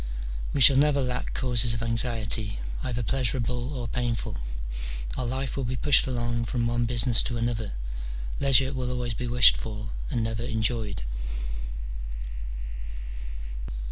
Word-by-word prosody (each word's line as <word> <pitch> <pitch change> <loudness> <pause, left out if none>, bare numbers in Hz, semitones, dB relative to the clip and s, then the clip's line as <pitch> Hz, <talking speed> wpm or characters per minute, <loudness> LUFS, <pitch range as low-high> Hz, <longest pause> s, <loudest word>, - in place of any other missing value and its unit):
We 140 - 0
shall 130 +2 +10
never 145 0 +4
lack 125 -2 -2
causes 120 -2 +3
of 115 - -3
anxiety, 115 -2 -1 0.2
either 120 -1 -2
pleasurable 125 +1 0
or 120 -2 -3
painful: 120 - -2 0.8
our 125 - -2
life 130 +2 -2
will 135 - -2
be 125 +1 -2
pushed 140 +2 +5
along 120 -2 -1
from 120 0 -1
one 120 0 +1
business 120 0 +3
to 120 - -2
another: 115 - -2 0.7
leisure 135 -1 +6
will 130 -2 -2
always 125 -2 -2
be 125 +2 -4
wished 120 +1 +8
for, 110 0 -5 0.2
and 120 -4 0
never 110 0 -2
enjoyed. 110 - -1
120 Hz, 135 wpm, -27 LUFS, 115-125 Hz, 0.8 s, shall